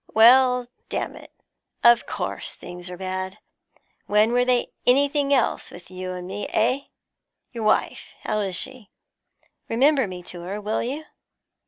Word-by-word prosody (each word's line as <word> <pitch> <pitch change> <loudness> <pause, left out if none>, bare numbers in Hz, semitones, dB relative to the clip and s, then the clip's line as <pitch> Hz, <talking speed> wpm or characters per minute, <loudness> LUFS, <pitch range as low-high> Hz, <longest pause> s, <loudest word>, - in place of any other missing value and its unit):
Why, 250 +2 +6 0.2
damn - - -3
it, - - -13 0.5
of 235 0 +6
course - - -4
things 175 0 -9
are 180 - -7
bad; 185 0 -4 0.7
when 210 +2 +4
were 245 0 +4
they 250 -1 +1 0.2
anything 280 +2 +3
else 265 -4 +1
with 175 +1 -13
you 185 0 -5
and 180 -1 -6
me, 200 +2 -4
eh? 250 +6 +1 0.7
Your 230 -3 -4
wife, 215 - 0
how 215 - -1
is 195 -3 -2
she? 245 +1 -6 0.8
Remember 265 +1 +3
me 180 -1 -8
to 175 0 -9
her, 190 +4 -5
will 210 +1 -1
you? 280 +6 -3
220 Hz, 150 wpm, -24 LUFS, 185-250 Hz, 0.8 s, Why